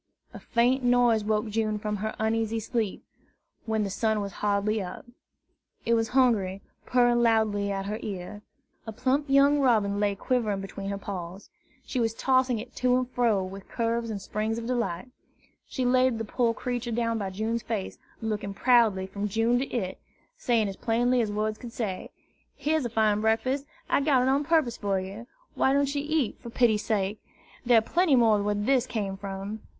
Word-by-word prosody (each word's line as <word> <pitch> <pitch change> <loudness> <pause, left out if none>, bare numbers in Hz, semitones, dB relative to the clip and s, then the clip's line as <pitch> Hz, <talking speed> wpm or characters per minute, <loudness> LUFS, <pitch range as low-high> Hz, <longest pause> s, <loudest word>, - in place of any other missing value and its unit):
A - - -8
faint 245 +3 +1
noise 245 -3 +3
woke 215 +1 0
June 215 0 0
from 210 0 -3
her 215 +2 -3
uneasy 225 0 0
sleep, 225 -2 -3 0.6
when 220 -1 +1
the 200 - -3
sun 220 +1 0
was 200 -1 -4
hardly 210 +1 +1
up. 180 -2 -7 0.8
It 235 - +2
was 225 -1 +2
Hungry, 220 -7 +2 0.2
purring 240 -1 +3
loudly 215 -3 +2
at 195 0 -3
her 210 +2 -3
ear. 200 +1 -6 0.5
A - - -3
plump 260 +6 0
young 280 +1 +5
robin 215 -7 +2
lay 205 -1 +1
quivering 215 -3 0
between 195 0 -6
her 200 - -2
paws. 190 -1 -7 0.3
She 260 - -3
was 225 -1 0
tossing 255 -1 +2
it 230 +3 -8
to 250 0 +3
and 255 0 -2
fro 230 -6 +2
with 190 +1 -9
curves 230 0 -1
and 210 -2 -3
springs 215 +3 -2
of 230 - -5
delight. 240 -3 -2 0.6
She 255 - -2
laid 255 -1 +3
the 225 - -3
poor 230 +1 0
creature 245 -1 -3
down 230 0 0
by 195 -2 -3
June's 220 +4 -2
face, 215 -4 -4 0.2
looking 210 -2 -3
proudly 225 -6 +3
from 200 +2 -4
June 225 +4 +2
to 270 - -2
it, 190 -6 -3 0.4
saying 230 -4 +1
as 195 - -6
plainly 245 +2 +2
as 215 -2 -1
words 215 +1 -2
could 235 -2 -9
say, 205 -7 -4 0.5
"Here's 300 0 0
a - - -1
fine 215 -2 +2
breakfast. 255 +6 0 0.2
I - - +2
got 275 -3 +3
it 260 - +2
on 280 +2 +2
purpose 310 -7 +2
for 200 -2 0
you. 195 +5 -8 0.3
Why 265 - +2
don't 280 0 +1
you 285 -1 -1
eat, 300 -5 -1
for 235 - -9
pity's 225 -3 +2
sake? 210 -1 -1 0.4
There 240 -2 +5
are - - +6
plenty 330 +5 +2
more 225 -4 +4
where 205 0 0
this 250 +5 +1
came 205 -5 -3
from!" 195 +2 -6
225 Hz, 185 wpm, -27 LUFS, 205-245 Hz, 0.8 s, are